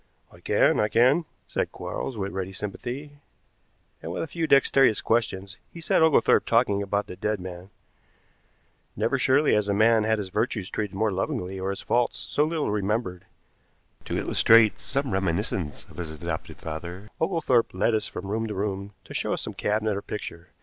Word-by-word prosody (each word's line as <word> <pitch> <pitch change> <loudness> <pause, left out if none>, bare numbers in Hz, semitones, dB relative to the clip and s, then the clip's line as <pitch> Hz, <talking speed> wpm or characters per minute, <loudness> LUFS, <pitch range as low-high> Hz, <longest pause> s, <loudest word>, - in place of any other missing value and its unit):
"I - - -16
can, - - +3
I 105 - +3
can," 130 +10 +4 0.2
said - - -2
Quarles, 125 - -5
with 100 -1 -3
ready 95 0 -4
sympathy, 125 +9 -6 0.8
and 80 - -5
with - - -2
a - - -4
few 160 +2 -2
dexterous 135 -4 +5
questions 105 -3 -1
he 170 - -10
set 160 - +2
Oglethorpe 160 -7 +4
talking 115 -4 +3
about 100 +1 -1
the - - -8
dead 105 +2 -1
man. 90 0 -8 1.3
Never - - 0
surely 145 +3 +4
has 105 -1 +2
a 100 - +2
man 110 +1 +4
had 110 0 +2
his 100 -3 -4
virtues 105 -1 -2
treated 105 -3 -3
more 110 +1 +1
lovingly 95 0 -3
or 95 +1 -2
his 100 - -4
faults 120 0 +1
so 145 - +3
little 155 -6 -1
remembered. 100 -3 -2 0.8
To - - -2
illustrate 110 -2 +5
some 140 -1 -2
reminiscence 95 -4 -1
of - - -17
his 85 -3 -4
adopted 80 -1 -5
father, 85 +6 -7
Oglethorpe 160 -9 +2
led 115 - +1
us 110 -1 0
from - - -7
room 110 +3 -2
to 105 - -5
room 100 0 -3
to - - -11
show - - -1
us - - -3
some - - -5
cabinet 105 0 0
or 100 - -3
picture. 90 -5 -7
105 Hz, 180 wpm, -26 LUFS, 95-120 Hz, 1.3 s, dexterous